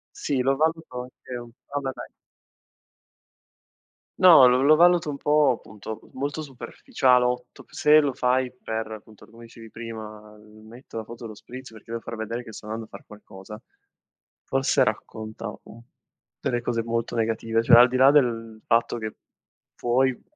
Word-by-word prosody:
Sì 140 -3 -2
lo 135 +2 +2
valuto 160 -4 -1
anche 125 0 -11
un 120 0 -9 0.2
vabbè 140 -2 -3
vai. - - -9 2.1
No, 170 -9 +8
lo 135 +5 +5
valuto 175 -1 +4
un 140 - -3
po', 150 -1 +3
appunto, 110 +1 -9
molto 145 +4 -4
superficialotto, 125 -1 -1
se 150 +1 +5
lo 140 -2 0
fai 125 0 0
per, 110 -3 -5
appunto, 110 -1 -12
come 115 +1 -15
dicevi 115 -1 -13
prima: 110 -2 -9
"Metto 110 +3 -13
la 110 - -5
foto 120 +1 -11
dello 110 -2 -8
spritz 130 +4 -11
perché 110 +1 -14
devo 115 0 -4
far 115 - -7
vedere 115 +2 -4
che 110 - -11
sto 105 - -11
andando 110 +1 -5
a - - -23
far - - -12
qualcosa", 105 +1 -12 0.8
forse 135 0 +2
racconta 110 0 -5
un 115 - -14 0.6
delle 120 -1 -1
cose 115 -1 -2
molto 115 0 -3
negative, 115 0 0
cioè 115 - +7
al 125 +1 +8
di 130 - -1
là 135 +2 +7
del 115 -6 +1
fatto 115 +1 +1
che 110 -1 -5 0.6
puoi 125 +1 +1
120 Hz, 155 wpm, -25 LUFS, 110-130 Hz, 2.1 s, No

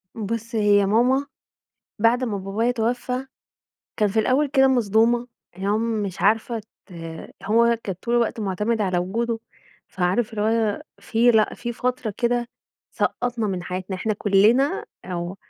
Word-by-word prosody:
بُص، 230 +2 -4
هي 205 -2 +4
ماما 250 +7 +3 0.7
بعد 235 +4 +3
ما 220 -5 -1
بابايا 200 +5 -1
توفى، 245 +2 -2 0.7
كان 210 -1 +2
في 220 +3 +1
الأول 260 +7 +2
كده 270 -1 +4
مصدومة 235 0 +2 0.3
اللي 190 +2 -4
هو 205 +1 +2
مش 215 -4 -2
عارفة 225 +2 +1 0.2
ت 190 - -15 0.5
هو 235 +3 +3
كان 195 - -3
طول 240 0 0
الوقت 235 -1 +1
معتمد 210 +3 -1
على 185 -3 0
وجوده، 225 +6 -1 0.5
فعارف 190 +5 0
اللي 210 - -2
هو 220 -1 +1 0.2
في، 225 +4 +3
لأ، 220 -2 +3
في 240 -1 -5
فترة 250 -3 -2
كده 240 0 0 0.4
سقطّنا 245 -3 -1
من 185 -3 -3
حياتنا، 185 +2 -4
إحنا 215 +4 -1
كلنا 220 - +3 0.2
آه. 175 0 -4
225 Hz, 145 wpm, -23 LUFS, 200-240 Hz, 0.7 s, هي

